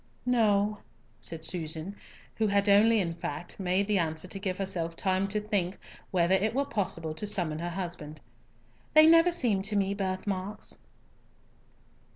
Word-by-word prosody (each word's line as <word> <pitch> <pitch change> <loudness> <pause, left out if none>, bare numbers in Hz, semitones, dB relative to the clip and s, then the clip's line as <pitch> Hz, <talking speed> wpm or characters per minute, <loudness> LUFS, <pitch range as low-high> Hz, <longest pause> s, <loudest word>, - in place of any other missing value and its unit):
"No," 210 -4 +2 0.4
said 160 -1 -7
Susan, 160 +2 -3 0.4
who 220 - +2
had 200 0 +2
in 205 -3 +4
fact 165 0 -6
only 185 -2 -4
made 195 +2 +2
the 210 -2 +2
answer 160 +1 -1
to 195 - -3
give 190 -2 -3
herself 175 -4 -2
time 190 +2 0
to 210 +2 -1
think 200 -3 -2 0.3
whether 175 0 +2
it 215 +4 +1
were 280 +1 +1
possible 170 - -2
to 210 +7 -4
summon 170 -7 +1
her 175 +1 -3
husband. 170 -4 -5 0.8
"They 310 0 +9
never 330 +2 +6
seemed 230 - +1
to 210 0 -2
me 200 -1 +1
birth 190 -2 -3
marks." 200 +1 -3
195 Hz, 160 wpm, -29 LUFS, 175-210 Hz, 0.8 s, They